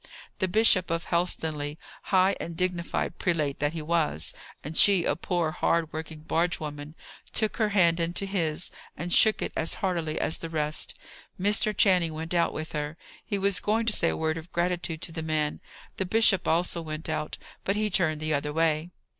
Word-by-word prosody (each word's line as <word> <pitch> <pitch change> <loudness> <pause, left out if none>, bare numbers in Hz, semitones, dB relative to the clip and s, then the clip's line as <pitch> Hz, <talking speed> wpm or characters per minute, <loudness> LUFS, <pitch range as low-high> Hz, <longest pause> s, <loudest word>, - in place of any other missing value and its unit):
The 190 - +2
Bishop 195 -2 +4
of 165 +1 -1
Helstonleigh, 155 -4 -1 0.3
high 190 0 +3
and 170 -1 -6
dignified 175 -1 -2
prelate 155 -5 0
that 145 +2 0
he 160 -2 -4
was, 155 - +1 0.3
and 150 +3 -6
she 195 -2 +5
a - - +1
poor, 175 -3 -1
hard 165 -1 0
working 160 -1 -6
barge 165 +2 0
woman, 150 0 -7 0.4
took 215 -1 +1
her 215 -3 +2
hand 175 -4 +3
into 170 +3 -1
his, 175 -4 -1 0.3
and 175 +2 -3
shook 220 -1 +5
it - - -4
as 160 - 0
heartily 170 -6 -1
as 160 - +1
the 165 - -5
rest. 155 -1 -1 0.4
Mr. 205 +2 +3
Channing 180 -5 +3
went 160 +2 -4
out 170 -1 +2
with 155 +1 -6
her. 150 +1 -4 0.3
He 205 - -2
was 200 -1 +1
going 220 +2 0
to 225 - +2
say 170 - +2
a - - -2
word 160 0 -1
of 160 +2 -13
gratitude 175 -2 -1
to 165 - -3
the 160 0 -4
man. 155 -1 -1 0.4
The 190 - -1
bishop 210 -2 +4
also 170 +1 +1
went 155 -1 -5
out, 155 -1 -3 0.3
but 195 - 0
he 210 0 0
turned 155 -4 +1
the 155 0 0
other 150 0 -1
way. 160 +1 +1
165 Hz, 190 wpm, -27 LUFS, 155-185 Hz, 0.4 s, she